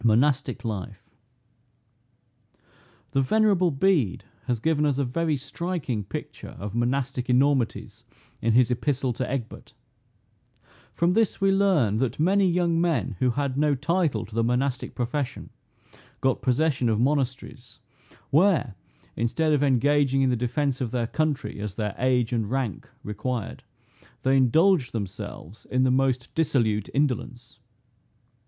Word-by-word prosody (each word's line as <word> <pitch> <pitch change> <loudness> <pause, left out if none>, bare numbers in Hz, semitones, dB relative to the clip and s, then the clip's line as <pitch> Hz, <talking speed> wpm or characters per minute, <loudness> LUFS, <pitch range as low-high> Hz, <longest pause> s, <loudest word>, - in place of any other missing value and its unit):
MONASTIC 130 +4 +2
LIFE. 105 0 -5 2.0
The 135 -1 +2
venerable 195 +3 +3
Bede 145 - +1 0.2
has 120 -2 0
given 150 +4 +1
us 145 -3 +1
a 140 - +1
very 155 +4 -1
striking 140 - -4
picture - - -8
of 100 0 -6
Monastic 125 +2 -1
enormities, 130 -1 +1 0.4
in 115 0 +1
his 125 0 +4
epistle 130 0 0
to 125 +2 -3
Egbert. 130 -4 -6 1.2
From 170 +1 +1
this 225 0 +1
we 195 0 +3
learn 185 - +2
that 130 +3 -1
many 190 +4 +3
young 170 -1 +1
men 150 - 0
who 130 - +2
had 140 +1 -1
no 150 -1 +3
title 150 - 0
to 105 - -15
the 115 +1 +1
monastic 125 +3 -1
profession, 130 +2 -3 0.7
got 130 -1 0
possession 130 -1 +1
of 110 -1 +1
monasteries; 130 -1 -2 0.5
where, 160 - +3 0.4
instead 155 +7 0
of 145 - +2
engaging 135 0 +2
in 130 - +2
the - - +1
defence 130 +3 -1
of 125 - -1
their 120 0 -1
country, 150 -1 -2
as 105 -2 -5
their 105 -3 -2
age 125 -2 +1
and 110 -3 -1
rank 130 -5 -3
required, 105 +2 -4 0.6
they 130 +1 +3
indulged 140 +3 +3
themselves 100 -2 -7
in 130 0 +1
the 130 - +3
most 130 -1 0
dissolute 115 -10 0
indolence. 125 -3 -2
130 Hz, 135 wpm, -25 LUFS, 120-150 Hz, 2.0 s, his